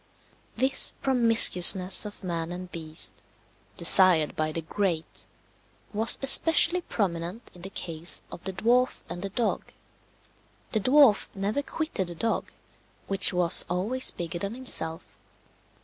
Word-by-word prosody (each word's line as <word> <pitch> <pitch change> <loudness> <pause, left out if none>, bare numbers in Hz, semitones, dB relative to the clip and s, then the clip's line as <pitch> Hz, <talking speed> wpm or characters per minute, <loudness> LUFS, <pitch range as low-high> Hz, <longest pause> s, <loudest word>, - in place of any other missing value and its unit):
This 265 +3 +2
promiscuousness 225 -7 +5
of 205 - -14
man 170 -2 -5
and 180 0 -9
beast, 160 -1 -6 0.6
desired 175 -5 +5
by 155 0 -3
the 165 +1 -6
great, 170 -2 -4 0.7
was 220 +2 +5
especially 325 +5 +3
prominent 185 - -6
in 175 - -16
the 190 - -9
case 165 -2 -6
of 170 - -11
the 190 - -5
dwarf 240 +6 -1
and 175 - -8
the 195 - -5
dog. 225 +4 -4 1.0
The 220 - -1
dwarf 255 -1 +2
never 200 +7 -3
quitted 285 - -5
the 175 - -8
dog, 225 +7 -3 0.5
which 195 -1 +3
was 180 -2 +2
always 210 +9 +2
bigger 170 0 -7
than 200 +5 -6
himself. 165 -11 -4
195 Hz, 130 wpm, -25 LUFS, 170-230 Hz, 1.0 s, promiscuousness